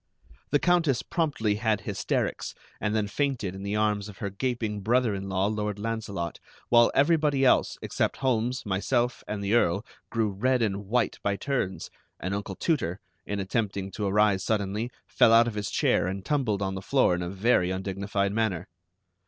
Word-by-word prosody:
The -, -, +4 dB
Countess 165 Hz, -6 st, +2 dB
promptly 125 Hz, -11 st, 0 dB
had 110 Hz, -2 st, +1 dB
hysterics, -, -, -2 dB, 0.2 s
and 105 Hz, +1 st, -1 dB
then 105 Hz, -2 st, +1 dB
fainted 120 Hz, -5 st, -1 dB
in 95 Hz, -, -8 dB
the 100 Hz, +1 st, -2 dB
arms 105 Hz, -1 st, 0 dB
of 100 Hz, -, -11 dB
her 100 Hz, -2 st, -4 dB
gaping 110 Hz, -1 st, -2 dB
brother 120 Hz, +2 st, +2 dB
in 95 Hz, 0 st, -4 dB
law, 95 Hz, 0 st, +1 dB
Lord 105 Hz, -1 st, -1 dB
Launcelot, 105 Hz, -6 st, -4 dB, 0.3 s
while 120 Hz, -1 st, +6 dB
everybody 145 Hz, -2 st, +3 dB
else, 125 Hz, -, +3 dB
except -, -, -1 dB
Holmes, 125 Hz, -1 st, 0 dB
myself, 120 Hz, +5 st, 0 dB
and 105 Hz, -1 st, -3 dB
the 100 Hz, +2 st, 0 dB
Earl, 100 Hz, -2 st, +2 dB, 0.2 s
grew 110 Hz, -3 st, 0 dB
red 125 Hz, +5 st, +1 dB
and 100 Hz, -2 st, -2 dB
white 125 Hz, +3 st, 0 dB
by 100 Hz, 0 st, 0 dB
turns; 100 Hz, -6 st, -2 dB, 0.3 s
and 90 Hz, +2 st, -3 dB
Uncle 100 Hz, -1 st, -4 dB
Tooter, 105 Hz, -, -1 dB, 0.3 s
in 100 Hz, 0 st, -2 dB
attempting 100 Hz, -1 st, -2 dB
to 105 Hz, 0 st, -2 dB
arise 100 Hz, -1 st, +3 dB
suddenly, 105 Hz, +2 st, -1 dB, 0.2 s
fell -, -, +4 dB
out 115 Hz, +1 st, +7 dB
of 120 Hz, -, -2 dB
his 105 Hz, -2 st, -3 dB
chair -, -, +2 dB
and 95 Hz, +1 st, -4 dB
tumbled 120 Hz, -9 st, 0 dB
on 95 Hz, 0 st, -1 dB
the 95 Hz, -, -5 dB
floor 130 Hz, -2 st, +3 dB
in 90 Hz, -, -1 dB
a 85 Hz, -, -3 dB
very 95 Hz, -1 st, +2 dB
undignified 100 Hz, +1 st, -2 dB
manner. 105 Hz, -6 st, -1 dB
105 Hz, 175 wpm, -27 LUFS, 100-120 Hz, 0.3 s, out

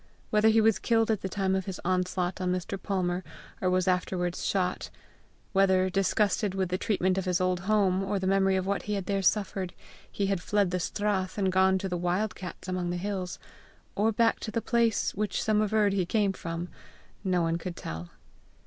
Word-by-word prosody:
whether 215 Hz, +1 st, +5 dB
he 225 Hz, 0 st, +5 dB
was 220 Hz, -1 st, +3 dB
killed 225 Hz, -1 st, +2 dB
at 215 Hz, -, 0 dB
the 190 Hz, -, -3 dB
time 190 Hz, -1 st, 0 dB
of 190 Hz, -1 st, 0 dB
his 190 Hz, -3 st, -5 dB
onslaught 180 Hz, 0 st, 0 dB
on 180 Hz, -1 st, 0 dB
Mr. 180 Hz, +1 st, -2 dB
Palmer, 185 Hz, -2 st, -1 dB, 0.4 s
or 185 Hz, -, +2 dB
was 185 Hz, 0 st, +1 dB
afterwards 180 Hz, -1 st, 0 dB
shot; 185 Hz, -2 st, -1 dB, 0.6 s
whether, 190 Hz, -1 st, +3 dB
disgusted 195 Hz, +1 st, +1 dB
with 190 Hz, -2 st, 0 dB
the 185 Hz, -, 0 dB
treatment 190 Hz, -2 st, +1 dB
of 190 Hz, -, -4 dB
his 180 Hz, -1 st, +1 dB
old 185 Hz, -1 st, +1 dB
home, 195 Hz, -1 st, +2 dB
or 195 Hz, +1 st, -1 dB
the 190 Hz, -, -2 dB
memory 195 Hz, 0 st, +3 dB
of 185 Hz, -1 st, 0 dB
what 200 Hz, +1 st, 0 dB
he 210 Hz, -, -3 dB
had 195 Hz, -2 st, -3 dB
there 195 Hz, 0 st, 0 dB
suffered, 190 Hz, -1 st, 0 dB, 0.4 s
he 200 Hz, -, -1 dB
had 195 Hz, -2 st, 0 dB
fled 200 Hz, -1 st, +1 dB
the 180 Hz, -, 0 dB
strath, 190 Hz, 0 st, -1 dB
and 190 Hz, -2 st, +1 dB
gone 190 Hz, 0 st, +4 dB
to 190 Hz, -, -3 dB
the 180 Hz, -1 st, -2 dB
wild 180 Hz, +5 st, 0 dB
cats 180 Hz, 0 st, -8 dB
among 185 Hz, -1 st, -2 dB
the 175 Hz, -, -2 dB
hills, 185 Hz, -1 st, -3 dB, 0.6 s
or 215 Hz, +3 st, +2 dB
back 225 Hz, +1 st, +2 dB
to -, -, -5 dB
the 215 Hz, -, -1 dB
place 230 Hz, -1 st, +1 dB
which 210 Hz, -1 st, -1 dB
some 215 Hz, -1 st, +2 dB
averred 210 Hz, -1 st, +2 dB
he 195 Hz, -2 st, +1 dB
came 200 Hz, +2 st, +1 dB
from, 170 Hz, -1 st, -5 dB, 0.6 s
no 180 Hz, -3 st, +1 dB
one 165 Hz, +1 st, 0 dB
could 175 Hz, 0 st, -5 dB
tell. 80 Hz, +2 st, -6 dB
190 Hz, 205 wpm, -28 LUFS, 180-205 Hz, 0.6 s, whether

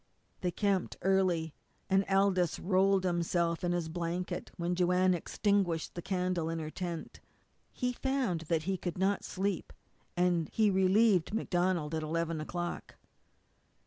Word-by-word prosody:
They 180 Hz, -, 0 dB
camped 195 Hz, 0 st, 0 dB
early, 180 Hz, -4 st, +2 dB, 0.3 s
and 195 Hz, 0 st, +3 dB
Aldous 195 Hz, -3 st, +2 dB
rolled 190 Hz, +1 st, +2 dB
himself 170 Hz, -1 st, 0 dB
in 175 Hz, -, +1 dB
his 175 Hz, -2 st, -1 dB
blanket 175 Hz, +2 st, -3 dB
when 175 Hz, +1 st, -1 dB
Joanne 180 Hz, +1 st, +3 dB
extinguished 180 Hz, -1 st, 0 dB
the 175 Hz, -, -5 dB
candle 180 Hz, -3 st, -1 dB
in 165 Hz, -, -2 dB
her 155 Hz, -1 st, -4 dB
tent. 170 Hz, -3 st, -5 dB, 0.5 s
He 250 Hz, 0 st, -2 dB
found 255 Hz, -10 st, -1 dB
that 165 Hz, -2 st, +1 dB
he 190 Hz, +2 st, -1 dB
could 175 Hz, -1 st, -4 dB
not 195 Hz, +2 st, +1 dB
sleep, 195 Hz, -1 st, -2 dB, 0.5 s
and 175 Hz, -3 st, +2 dB
he 215 Hz, -2 st, +3 dB
relieved 190 Hz, 0 st, +3 dB
MacDonald 175 Hz, -6 st, 0 dB
at 160 Hz, -, -1 dB
eleven 165 Hz, 0 st, -2 dB
o'clock. 175 Hz, +2 st, -5 dB
180 Hz, 140 wpm, -32 LUFS, 170-195 Hz, 0.5 s, and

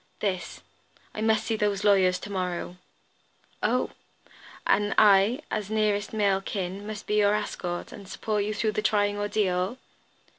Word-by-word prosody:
"This. 190 Hz, -4 st, -3 dB, 0.5 s
I 215 Hz, -, -5 dB
must 220 Hz, -1 st, +2 dB
meet 225 Hz, -, 0 dB
those 205 Hz, -1 st, 0 dB
lawyers 190 Hz, -3 st, +4 dB
to 205 Hz, -, -7 dB
morrow." 180 Hz, -2 st, -3 dB, 0.8 s
"Oh! -, -, +1 dB, 0.7 s
And 205 Hz, -1 st, +2 dB
I 210 Hz, +5 st, +5 dB
as 210 Hz, -2 st, -2 dB
nearest 215 Hz, -1 st, 0 dB
male 200 Hz, -3 st, +2 dB
kin, 195 Hz, +1 st, -4 dB
must 215 Hz, -1 st, -6 dB
be 210 Hz, -, 0 dB
your 205 Hz, 0 st, +4 dB
escort, 180 Hz, -4 st, -4 dB
and 200 Hz, -2 st, -10 dB
support 210 Hz, +2 st, -2 dB
you 210 Hz, +1 st, -2 dB
through 215 Hz, 0 st, 0 dB
the 215 Hz, -, -1 dB
trying 205 Hz, -1 st, +1 dB
ordeal." 205 Hz, 0 st, 0 dB
205 Hz, 150 wpm, -27 LUFS, 195-215 Hz, 0.8 s, I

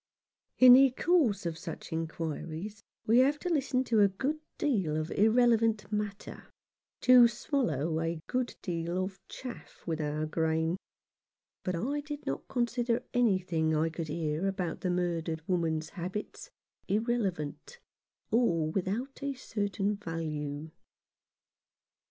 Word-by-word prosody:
In 255 Hz, -1 st, +10 dB
the 270 Hz, +1 st, +8 dB
course 260 Hz, -, +2 dB
of 165 Hz, -1 st, -3 dB
such 170 Hz, -2 st, -7 dB
inquiries 165 Hz, +4 st, -4 dB, 0.2 s
we 230 Hz, +3 st, +5 dB
have 280 Hz, +3 st, +4 dB
to 360 Hz, -, -4 dB
listen 270 Hz, -3 st, +1 dB
to 230 Hz, -4 st, +2 dB
a 205 Hz, -, +7 dB
good 265 Hz, +11 st, -2 dB, 0.2 s
deal 195 Hz, -, +1 dB
of 155 Hz, +1 st, -3 dB
irrelevant 225 Hz, 0 st, +3 dB
matter, 210 Hz, -1 st, -4 dB, 0.5 s
to 250 Hz, -1 st, +8 dB
swallow 170 Hz, -, -1 dB
a 165 Hz, 0 st, -2 dB
good 250 Hz, -1 st, -2 dB
deal 170 Hz, 0 st, -2 dB
of 190 Hz, 0 st, -6 dB
chaff 250 Hz, -2 st, -9 dB
with 160 Hz, -2 st, -2 dB
our 150 Hz, +1 st, -1 dB
grain; 160 Hz, +1 st, 0 dB, 0.9 s
but 185 Hz, -, -1 dB
I 270 Hz, +12 st, -1 dB
did 295 Hz, 0 st, -7 dB
not 135 Hz, -, -3 dB
consider 240 Hz, 0 st, 0 dB
anything 185 Hz, -9 st, +2 dB
I 160 Hz, +1 st, +1 dB
could 165 Hz, 0 st, -4 dB
hear 155 Hz, +3 st, -1 dB
about 180 Hz, -4 st, -3 dB
the 185 Hz, -, -1 dB
murdered 170 Hz, -2 st, -1 dB
woman's 160 Hz, -3 st, 0 dB
habits 190 Hz, -, -6 dB, 0.4 s
irrelevant, 210 Hz, -, -1 dB, 0.5 s
or 170 Hz, -10 st, +2 dB
without 205 Hz, +10 st, -3 dB
a 280 Hz, 0 st, -2 dB
certain 205 Hz, -4 st, -2 dB
value. 155 Hz, -4 st, -4 dB
190 Hz, 130 wpm, -30 LUFS, 165-240 Hz, 0.9 s, In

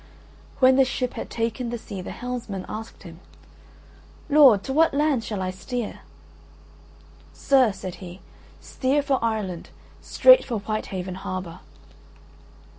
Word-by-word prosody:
When 260 Hz, 0 st, +5 dB
the 270 Hz, -, +6 dB
ship 255 Hz, -1 st, -2 dB
had -, -, -6 dB
taken 230 Hz, +1 st, -3 dB
the 240 Hz, -, -3 dB
sea 200 Hz, -4 st, -8 dB
the -, -, -8 dB
helmsman 235 Hz, -6 st, -5 dB
asked 220 Hz, +1 st, -8 dB
him: 165 Hz, -2 st, -12 dB, 1.1 s
"Lord, 270 Hz, -9 st, +6 dB
to 265 Hz, -, -4 dB
what 320 Hz, 0 st, +3 dB
land 290 Hz, -5 st, +1 dB
shall 205 Hz, -4 st, -4 dB
I 185 Hz, -, -2 dB
steer?" 210 Hz, +5 st, -5 dB, 1.3 s
"Sir," 260 Hz, -5 st, +3 dB
said 190 Hz, -1 st, -7 dB
he, 180 Hz, 0 st, -9 dB, 0.4 s
"steer 280 Hz, +2 st, -1 dB
for 270 Hz, -4 st, 0 dB
Ireland, 210 Hz, -7 st, -3 dB, 0.3 s
straight -, -, +6 dB
for 240 Hz, -4 st, -3 dB
Whitehaven 190 Hz, -3 st, -4 dB
harbour." 185 Hz, -3 st, -6 dB
230 Hz, 130 wpm, -24 LUFS, 190-260 Hz, 1.3 s, the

